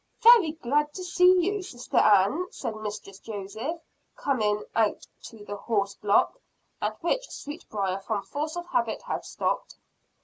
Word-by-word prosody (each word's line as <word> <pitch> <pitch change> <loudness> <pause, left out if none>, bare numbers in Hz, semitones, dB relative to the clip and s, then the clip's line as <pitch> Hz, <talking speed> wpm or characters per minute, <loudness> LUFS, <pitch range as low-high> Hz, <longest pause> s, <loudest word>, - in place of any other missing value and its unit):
"Very 455 -10 +8
glad 295 0 0
to 370 - -5
see 360 0 +5
you, 405 +1 0
Sister 245 -9 -5
Ann," 210 - +4
said 225 - -5
Mistress 210 -2 -7
Joseph, 220 - -5 0.4
coming 210 -6 0
out 220 -2 +1 0.2
to 215 -3 -11
the 205 - -5
horse 200 -1 -1
block, 210 - +2 0.4
at - - -3
which - - 0
Sweetbriar, 200 - -4
from 200 0 -3
force 305 +3 -4
of 350 - -4
habit, 235 -10 -1
had - - -3
stopped. - - -2
235 Hz, 145 wpm, -27 LUFS, 205-340 Hz, 0.4 s, Very